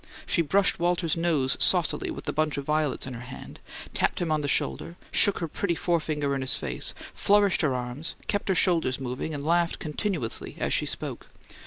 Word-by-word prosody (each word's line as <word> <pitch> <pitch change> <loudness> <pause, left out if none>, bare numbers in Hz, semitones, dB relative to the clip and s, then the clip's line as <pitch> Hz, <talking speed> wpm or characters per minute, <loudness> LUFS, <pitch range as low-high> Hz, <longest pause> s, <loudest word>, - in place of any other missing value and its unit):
She 170 - +2
brushed 185 +5 +2
Walter's 175 -1 +1
nose 160 -6 +1
saucily - - +3
with - - -6
the - - -2
bunch 155 0 0
of 140 - -3
violets 150 -1 0
in 130 - -6
her 115 - -7
hand, 125 +1 -9 0.3
tapped - - +1
him 170 -2 -1
on 155 -1 +2
the 145 - -2
shoulder, 165 +4 -1 0.2
shook 200 - +4
her 165 - -2
pretty 170 +3 -1
forefinger 155 -5 0
in 135 - -1
his 130 - +1
face, - - -3 0.2
flourished 205 -2 +3
her 140 -5 +1
arms, 125 +5 -4
kept 205 0 -1
her 190 - +3
shoulders 165 -8 +2
moving, 130 +4 -4
and 145 -1 -5
laughed 170 +1 +2
continuously 155 - -3
as - - 0
she - - +1
spoke. - - -5
155 Hz, 195 wpm, -27 LUFS, 140-175 Hz, 0.3 s, shook